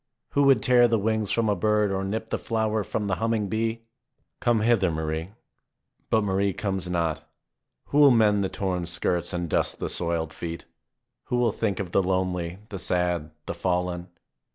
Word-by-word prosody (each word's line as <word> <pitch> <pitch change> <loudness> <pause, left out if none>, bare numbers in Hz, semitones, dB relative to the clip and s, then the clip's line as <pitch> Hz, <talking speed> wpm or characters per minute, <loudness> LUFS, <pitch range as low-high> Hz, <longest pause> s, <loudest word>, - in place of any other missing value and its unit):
Who 140 0 +3
would 135 -6 +5
tear 120 -1 +5
the 115 -1 +2
wings 110 0 0
from 115 -1 +1
a 105 - +2
bird 105 +1 +2
or 95 0 -1
nip 110 +3 -4
the - - 0
flower 110 -1 -1
from 105 +1 -3
the 95 -2 -1
humming 110 -2 0
bee? 115 +2 -1 0.6
Come 120 -2 +2
hither, 110 -5 +3
Marie! 80 +1 -3 0.8
But 110 -1 +3
Marie 100 0 +1
comes 95 -3 -3
not. 85 -3 -1 0.7
Who 145 - +2
will 145 -1 +8
mend 105 -4 +4
the 95 - -1
torn 90 -3 -2
skirts 85 0 -1
and 90 -2 -2
dust - - 0
the - - -3
soiled 85 -2 -1
feet? 85 -1 -6 0.6
Who - - -2
will 120 -2 +2
think 100 -3 -2
of 95 -3 -4
the 100 - +3
lonely, 90 -2 -1
the 100 - -6
sad, 90 -3 0 0.2
the - - -3
fallen 90 -1 -1
100 Hz, 180 wpm, -26 LUFS, 90-110 Hz, 0.8 s, will